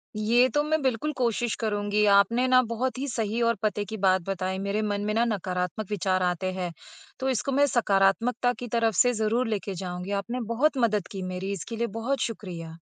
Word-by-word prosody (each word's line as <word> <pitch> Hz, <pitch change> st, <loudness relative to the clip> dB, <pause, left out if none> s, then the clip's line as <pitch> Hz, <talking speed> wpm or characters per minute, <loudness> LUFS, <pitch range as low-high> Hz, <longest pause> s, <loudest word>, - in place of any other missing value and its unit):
ये 230 Hz, +4 st, +4 dB
तो 295 Hz, -, +3 dB
मैं 315 Hz, +1 st, 0 dB
बिल्कुल 265 Hz, +3 st, 0 dB
कोशिश 240 Hz, -2 st, 0 dB
करुँगी। 210 Hz, -1 st, +1 dB
आपने 230 Hz, +6 st, +4 dB
ना 255 Hz, 0 st, +6 dB
बहुत 250 Hz, +1 st, -1 dB
ही 280 Hz, -, -2 dB
सही 225 Hz, -2 st, -2 dB
और 230 Hz, 0 st, +3 dB
पते 210 Hz, -1 st, 0 dB
की 220 Hz, +3 st, -6 dB
बात 190 Hz, -1 st, +3 dB
बताई। 190 Hz, -1 st, -2 dB
मेरे 200 Hz, +2 st, -1 dB
मन 205 Hz, -1 st, -1 dB
में 210 Hz, -, 0 dB
ना 230 Hz, +2 st, +3 dB
नकारात्मक 185 Hz, -2 st, -2 dB
विचार 190 Hz, -2 st, 0 dB
आते 180 Hz, +1 st, 0 dB
हैं, 180 Hz, -2 st, -3 dB, 0.5 s
तो 265 Hz, -, 0 dB
इसको 260 Hz, +1 st, -1 dB
मैं 280 Hz, +2 st, +4 dB
सकारात्मकता 230 Hz, +1 st, +2 dB
की 245 Hz, -, -5 dB
तरफ 225 Hz, -1 st, +2 dB
से 245 Hz, +6 st, +4 dB
ज़रूर 230 Hz, +3 st, +1 dB
लेके 205 Hz, -2 st, -2 dB
जाऊँगी। 180 Hz, +1 st, -5 dB
आपने 240 Hz, +5 st, -4 dB
बहुत 285 Hz, +4 st, +2 dB
मदद 215 Hz, -6 st, +1 dB
की 195 Hz, -, -5 dB
मेरी, 190 Hz, +2 st, -3 dB
इसके 200 Hz, +4 st, -5 dB
लिए 235 Hz, +1 st, 0 dB
बहुत 270 Hz, +4 st, -1 dB
शुक्रिया। 170 Hz, -7 st, -5 dB
215 Hz, 200 wpm, -26 LUFS, 195-240 Hz, 0.5 s, ना